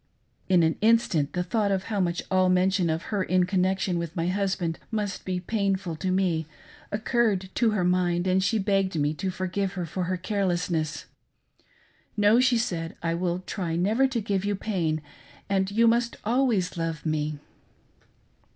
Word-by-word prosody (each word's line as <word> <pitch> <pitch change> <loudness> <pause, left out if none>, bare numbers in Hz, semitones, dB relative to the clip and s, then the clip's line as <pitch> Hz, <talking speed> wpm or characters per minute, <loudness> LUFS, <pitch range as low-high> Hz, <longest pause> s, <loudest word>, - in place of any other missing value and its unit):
In 180 -3 +5
an 160 0 +1
instant 210 -10 +3
the 180 - 0
thought 205 +3 0
of 190 -1 0
how 210 -1 -3
much 175 -2 0
all 185 -1 +4
mention 185 -1 +2
of 160 +2 -1
her 200 - +1
in 185 0 +2
connection 185 -1 0
with 170 -1 -5
my 170 0 0
husband 185 -4 -1
must 210 -3 -3
be 185 -1 -1
painful 195 -3 -1
to 185 - -2
me, 180 -4 +1 0.4
occurred 210 -3 0
to 235 - +2
her 210 -4 0
mind, 175 -1 +1
and 190 0 +2
she 225 - +2
begged 195 -4 +1
me 145 +1 +1
to 185 +5 -3
forgive 185 +1 -2
her 180 -2 -3
for 180 +3 -3
her 185 +1 -1
care 200 +3 -2
lessness. 175 -3 -1 0.6
" - - -36
No," 210 +3 +5
said 230 -10 +1
she, - - -29
" - - -22
I 165 - +1
will 175 +1 -1
try 175 -4 -3
never 215 +10 +2
to 260 -3 -2
give 195 -2 -1
you 205 0 0
pain, 170 -7 -1 0.4
and 195 -1 +1
you 225 +3 +3
must 235 +1 +2
always 225 -7 +1
love 165 -1 -3
me." 155 -1 -1
185 Hz, 180 wpm, -26 LUFS, 175-205 Hz, 0.6 s, In